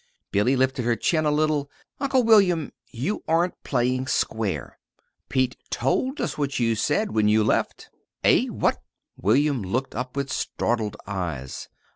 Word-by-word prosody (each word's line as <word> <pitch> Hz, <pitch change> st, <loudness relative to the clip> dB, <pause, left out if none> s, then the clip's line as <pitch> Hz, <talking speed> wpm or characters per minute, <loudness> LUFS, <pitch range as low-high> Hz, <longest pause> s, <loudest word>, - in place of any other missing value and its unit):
Billy 105 Hz, +7 st, +3 dB
lifted 130 Hz, 0 st, +1 dB
her 120 Hz, 0 st, +2 dB
chin 155 Hz, +5 st, +1 dB
a -, -, +3 dB
little. 150 Hz, -1 st, +1 dB, 0.3 s
"Uncle 265 Hz, -2 st, +2 dB
William, 195 Hz, -9 st, +4 dB, 0.2 s
you 140 Hz, -, -3 dB
aren't 170 Hz, +2 st, +1 dB
playing 130 Hz, 0 st, 0 dB
square. 110 Hz, -5 st, -2 dB, 0.5 s
Pete 130 Hz, -1 st, +1 dB
told 260 Hz, -, 0 dB
us -, -, -3 dB
what 140 Hz, -1 st, -1 dB
you 115 Hz, -1 st, +2 dB
said 150 Hz, -, 0 dB
when 110 Hz, -1 st, +2 dB
you 110 Hz, +1 st, +4 dB
left." 110 Hz, -, -1 dB, 0.3 s
"Eh? -, -, +4 dB
What?" -, -, 0 dB, 0.3 s
William 135 Hz, -, +2 dB
looked 120 Hz, +8 st, -2 dB
up 125 Hz, +3 st, -4 dB
with 140 Hz, -1 st, -2 dB
startled 110 Hz, -3 st, -1 dB
eyes. 85 Hz, -10 st, -5 dB
130 Hz, 145 wpm, -24 LUFS, 110-155 Hz, 0.5 s, William